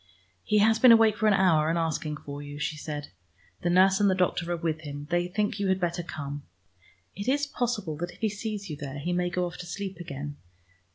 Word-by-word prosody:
"He 210 - +2
has 220 +2 +4
been 250 +1 +8
awake 225 -2 +6
for 220 - +1
an 210 - +5
hour 165 -5 +4
and 165 - +1
asking 155 -2 -1
for 145 -1 -8
you," 145 0 -8
she 150 +1 -2
said. 150 -1 -6 0.5
"The 175 - 0
nurse 190 +2 +5
and 205 -1 +4
the 190 - +3
doctor 175 -1 0
are 175 - 0
with 160 -2 -2
him: 145 -1 -7
they 175 0 +2
think 205 +2 -1
you 200 - 0
had 190 0 +2
better 175 -1 -1
come. 145 -3 -6 0.7
It 200 +3 -6
is 285 +2 +2
possible 235 - -2
that 175 +2 -3
if - - -18
he 220 - +1
sees 210 -1 -5
you 155 - -5
there, 140 -1 -6
he 170 +5 -2
may 175 0 +1
go 180 +1 0
off 175 0 -6
to 180 - -8
sleep 195 0 -5
again. 145 -3 -6
175 Hz, 235 wpm, -28 LUFS, 155-200 Hz, 0.7 s, been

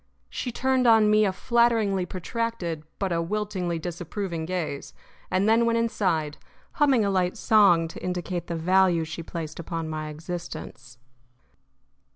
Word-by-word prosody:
She 245 - -3
turned 260 +1 +1
on 220 -2 +6
me 215 0 +5
a 195 - +2
flatteringly 220 -3 +2
protracted 185 -4 -3 0.2
but 195 -2 -2
a 170 -1 +1
wiltingly 185 -2 -2
disapproving 170 0 -4
gaze, 165 -6 -4 0.3
and 190 +3 +1
then 225 +2 +4
went 230 0 +2
inside, 180 -10 0 0.3
humming 270 -7 +3
a 200 - +1
light 185 -2 0
song 195 -7 +4
to - - -10
indicate 180 -1 -3
the 170 - -3
value 180 0 +3
she 165 +1 -6
placed 165 -1 -6
upon 165 -1 -4
my 155 -1 -4
existence. 155 -6 -7
185 Hz, 145 wpm, -26 LUFS, 165-215 Hz, 0.3 s, on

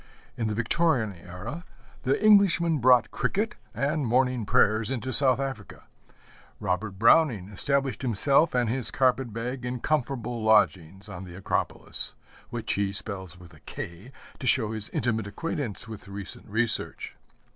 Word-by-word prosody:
In 115 -4 -2
the 105 - -2
Victorian 115 -1 +1
era 90 - -8 0.4
the 135 +2 0
Englishman 175 -6 +5
brought 125 0 +4
cricket 220 +4 -1 0.2
and 145 0 -1
morning 125 -2 +1
prayers 110 +1 +2
into 130 0 -3
South 130 -2 +6
Africa. 135 -7 -6 0.8
Robert 95 +2 -3
Browning 115 - +3
established 140 +6 -1
himself 135 - +3
and 120 -1 +2
his 125 +1 0
carpet 130 -2 +1
bag 120 +3 -5
in 125 0 -4
comfortable 125 -5 -2
lodgings 100 -3 +2
on 95 -2 -8
the 90 -2 -10
Acropolis 95 - -3 0.3
which - - -3
he 100 -1 -1
spells 95 -3 -6
with 85 -2 -15
a - - -17
K 90 +9 -9 0.3
to 130 - -4
show 110 -5 +2
his 110 -2 -5
intimate 110 -3 -1
acquaintance 125 - -4
with 110 -2 -10
recent 100 +2 -9
research. 110 +2 +2
120 Hz, 145 wpm, -26 LUFS, 100-135 Hz, 0.8 s, South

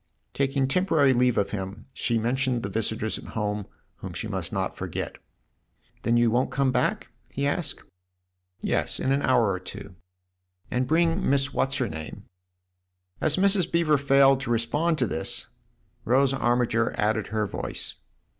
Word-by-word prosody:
Taking 135 -1 +1
temporary 150 -4 +3
leave 125 -1 +2
of 100 - +1
him, 100 +1 -5
she 115 - 0
mentioned 125 +1 0
the 100 - -3
visitors 110 +1 -1
at - - -11
home 105 -1 -2 0.3
whom - - -7
she - - -4
must - - -3
not - - -2
forget. - - -5 0.4
" - - -39
Then 120 0 +2
you 120 -1 +4
won't 125 +3 +2
come 140 -2 +1
back? - - 0
" - - -39
he 140 - 0
asked. 145 +3 -1 0.5
" 90 0 -47
Yes, - - -1
in 130 - 0
an 140 +1 +2
hour 120 -6 +3
or 95 - -2
two." 95 +1 -9 0.8
"And 125 0 0
bring 165 +4 +2
Miss 135 0 +1
What's 135 +1 0
her - - 0
name?" 80 0 -7 1.0
As 155 +1 +2
Mrs. 195 -1 +3
Beever 160 -4 +3
failed 135 -1 +5
to 135 - -5
respond 145 +9 +1
to 125 - +2
this, 80 -7 -2 0.6
Rose 135 +3 +3
Armiger 120 -3 +1
added 105 0 +1
her 110 0 -1
voice. - - -5
125 Hz, 165 wpm, -26 LUFS, 110-140 Hz, 1.0 s, failed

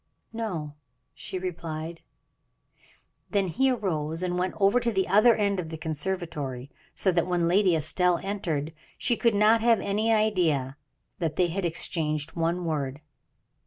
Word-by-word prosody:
"No," 180 -10 -4 0.4
she - - -6
replied. 165 -2 -5 1.3
Then 200 -2 +1
he 265 +10 +2
arose 165 -8 -2
and 180 -1 -1
went 180 +1 -1
over 200 +4 +4
to 235 -1 0
the 190 -3 0
other 215 +5 +5
end 200 -2 0
of 165 -3 -4
the 160 - -6
conservatory, 150 -5 -3 0.2
so 190 - +3
that 170 -1 +1
when 175 -2 +1
Lady 185 0 +3
Estelle 175 +3 +1
entered, 165 -7 -3 0.2
she 240 - +2
could 230 -2 +2
not 215 +2 +4
have 230 -1 +4
any 215 +3 0
idea 175 -12 +1 0.4
that 160 -4 -1
they 180 -1 +2
had 185 +2 -2
exchanged 160 -2 0
one 170 +1 -1
word. 145 -4 -2
180 Hz, 150 wpm, -27 LUFS, 160-200 Hz, 1.3 s, other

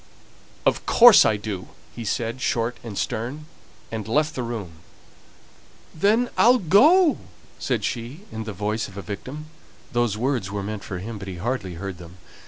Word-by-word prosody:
"Of - - +1
course 235 -3 +8
I 110 - +2
do!" 100 -3 -5 0.3
he 120 - -6
said, 115 +3 -2
short 115 0 0
and 110 -4 -7
stern, 130 +7 -3 0.5
and 110 -2 -4
left 150 +7 +1
the 130 - -3
room. 110 -9 -5 1.2
"Then 215 +8 +2
I'll 245 +2 +6
go!" 295 - +5 0.4
said - - -1
she, 120 +8 -4
in 110 0 -5
the 110 - -4
voice 105 +3 -2
of 100 - -13
a 100 - -5
victim 135 - -7 0.4
those 120 -3 0
words 120 -5 -1
were 100 -1 -4
meant 105 0 -5
for 95 - -5
him, 105 +4 -6
but 95 - -8
he 95 - -5
hardly 100 -3 -3
heard 95 0 -6
them. 85 +1 -12
115 Hz, 170 wpm, -24 LUFS, 100-145 Hz, 1.2 s, course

